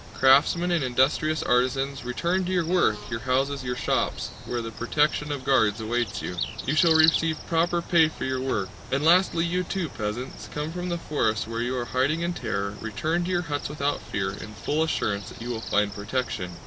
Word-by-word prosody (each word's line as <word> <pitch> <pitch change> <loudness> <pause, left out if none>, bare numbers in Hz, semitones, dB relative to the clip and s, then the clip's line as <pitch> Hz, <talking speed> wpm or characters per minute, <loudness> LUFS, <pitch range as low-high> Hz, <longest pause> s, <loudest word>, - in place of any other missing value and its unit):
Craftsmen 150 +6 +4
and 170 -5 +2
industrious 135 +5 +1
artisans, 130 +2 +1
return 170 +10 0
to 185 - -2
your 175 -3 +1
work, 170 -11 +2
your 115 - -2
houses, 135 +2 0
your 125 -1 -2
shops, 120 - -1 0.2
where 120 - -2
the 115 - -5
protection 150 +5 0
of 140 -3 -4
guards 110 -6 +3
awaits 120 +2 -2
you! 90 - -4 0.3
You 135 - 0
shall 160 +1 +5
receive 160 0 +4
proper 170 +1 +1
pay 165 -2 +4
for 155 - -6
your 130 0 -1
work. 105 -8 -1 0.2
And 135 +2 +1
lastly 170 0 +4
you 180 +2 0
too, 180 -2 -3
peasants, 110 +5 -5
come 150 +1 -3
from 180 +1 -4
the 175 - -1
forests 110 -11 -1
where 115 0 -3
you 125 +2 -1
are 120 - -2
hiding 135 +7 0
in 170 +1 -1
terror, 100 -9 -3
return 155 +11 -1
to - - -3
your 175 -1 +1
huts 145 -3 -3
without 145 -1 -1
fear, 95 -1 -2
in 105 +2 -9
full 145 - -1
assurance 105 -10 -1
that - - -12
you 120 +1 -6
will 115 -2 -3
find 105 -2 +1
protection! 105 -2 -3
135 Hz, 200 wpm, -26 LUFS, 120-165 Hz, 0.3 s, shall